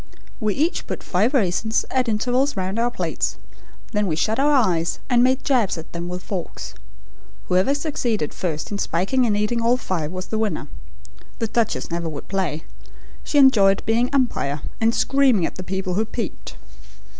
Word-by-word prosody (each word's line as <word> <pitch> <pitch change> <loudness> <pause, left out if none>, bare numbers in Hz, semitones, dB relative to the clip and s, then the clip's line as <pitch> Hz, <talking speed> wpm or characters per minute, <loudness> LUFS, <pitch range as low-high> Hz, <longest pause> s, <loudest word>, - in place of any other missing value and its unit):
We 215 -4 0
each 320 +5 0
put - - -5
five 205 +7 +1
raisins 220 0 +1
at 255 -2 +1
intervals 250 +4 +1
round 190 +3 -2
our 240 +1 +2
plates, 240 - -2 0.5
then 210 -2 0
we 160 - 0
shut 215 +10 0
our 290 +2 +4
eyes 180 - +2
and 240 0 +5
made 260 +1 +2
jabs 245 - +2
at 160 - -9
them 170 +1 -4
with 180 +1 -5
forks. 185 -4 -5 0.8
Whoever 185 +10 +3
succeeded 245 - -1
first 160 -2 -3
in 200 - -3
spiking 200 +11 +1
and 205 -2 +1
eating 210 +3 0
all 235 +2 +3
five 165 -10 -3
was 185 0 -6
the 220 - -1
winner. 210 -9 -1 0.7
The 230 - -1
duchess 225 -4 -1
never 170 -1 -2
would 145 -2 -7
play. 175 -6 -1 0.6
She - - -1
enjoyed 210 -8 +5
being 235 +3 +2
umpire, 240 - 0 0.2
and 225 +1 +3
screaming 265 -10 +3
at - - -5
the - - -5
people 190 0 -3
who 215 +4 +1
peeped. 220 -2 -5
215 Hz, 175 wpm, -22 LUFS, 180-245 Hz, 0.8 s, and